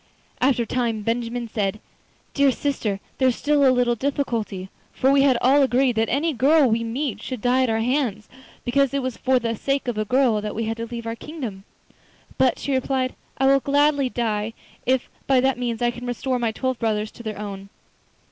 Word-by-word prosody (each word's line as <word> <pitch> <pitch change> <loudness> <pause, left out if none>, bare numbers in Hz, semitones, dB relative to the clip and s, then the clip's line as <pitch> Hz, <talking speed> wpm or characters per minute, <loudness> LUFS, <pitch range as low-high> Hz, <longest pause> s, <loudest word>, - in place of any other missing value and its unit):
After 255 -2 +2
a - - -6
time 230 -2 -1
Benjamin 235 +1 -2
said: 210 -2 -2 0.5
'Dear 280 -1 +4
sister, 235 -8 -2 0.2
there 260 - +4
is 250 - +2
still 290 -1 +2
a 270 - +6
little 250 -1 +3
difficulty, 230 -7 -2 0.2
for 265 +1 +2
we 275 0 +5
had 270 -3 +4
all 275 +3 +5
agreed 260 -2 +2
that 225 0 +2
any 300 +5 +1
girl 285 +3 +4
we 230 0 +1
met 235 0 -3
should 255 0 -5
die 250 +4 +2
at 255 - +2
our 225 0 +1
hands, 235 -4 -1 0.4
because 275 +2 +2
it 275 - 0
was 255 -2 -3
for 260 0 +2
the 230 -2 -1
sake 275 +4 -1
of 235 -3 -1
a - - +1
girl 245 -2 +2
that 210 0 -5
we 225 - -1
had 225 +1 -2
to 230 0 -4
leave 235 0 -6
our 230 0 -3
kingdom.' 230 -8 -7 0.7
'But,' 260 -2 +3
she 280 - -3
replied, 260 0 0 0.2
'I 270 - +1
will 275 0 +5
gladly 285 -1 +2
die 225 -2 -2 0.3
if 260 0 +2 0.2
by 270 -2 +4
that 265 -1 +1
means 240 -1 -2
I 240 - +3
can 245 +1 -8
restore 250 +1 -1
my 230 -2 0
twelve 260 +2 -2
brothers 215 -1 -1
to - - -12
their 215 -3 -5
own. 200 -1 -7
245 Hz, 210 wpm, -23 LUFS, 225-270 Hz, 0.7 s, a